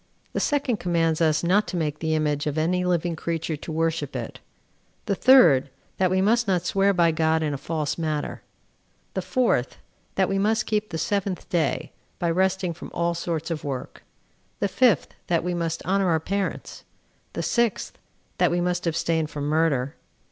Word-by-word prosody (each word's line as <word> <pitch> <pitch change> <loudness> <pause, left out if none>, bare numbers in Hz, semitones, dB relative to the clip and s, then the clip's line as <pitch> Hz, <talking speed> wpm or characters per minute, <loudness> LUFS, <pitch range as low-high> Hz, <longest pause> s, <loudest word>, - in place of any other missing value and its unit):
The - - -1
second 280 -6 +1
commands 165 -3 0
us 155 -1 +2
not 195 +5 +3
to 180 - -3
make 150 -3 -2
the 160 -1 0
image 150 -1 0
of 150 +1 -2
any 180 +3 +1
living 175 -1 0
creature 165 0 -3
to 155 - -8
worship 160 -3 -1
it. 120 -3 -5 0.7
The - - 0
third, 175 - +6 0.3
that 185 -1 +3
we 185 +1 +2
must 230 +3 +2
not 180 -3 +1
swear 195 +3 +3
by 170 -3 +3
God 160 0 +1
in 150 -2 -1
a - - -2
false 155 0 -2
matter. 155 -2 -2 0.7
The - - -1
fourth, 235 - 0 0.4
that 190 -1 +2
we 195 0 0
must 215 +2 +1
keep 215 -1 -1
the 165 - -4
seventh 195 +2 -2
day, 170 -3 0 0.3
by 170 -1 0
resting 185 0 +1
from 165 - -10
all 170 0 +1
sorts 170 -1 -3
of 160 - -3
work. 135 -3 -5 0.6
The 200 - 0
fifth, 220 - +2
that 170 -1 +1
we 180 0 -1
must 165 -1 -3
honor 195 0 +2
our 160 -1 +3
parents. 195 +4 -3 0.5
The - - -3
sixth 235 -3 0 0.4
that - - +4
we 175 - 0
must 175 0 -1
abstain 160 -1 0
from 150 -2 -6
murder. 145 -4 +1
170 Hz, 180 wpm, -25 LUFS, 160-190 Hz, 0.7 s, third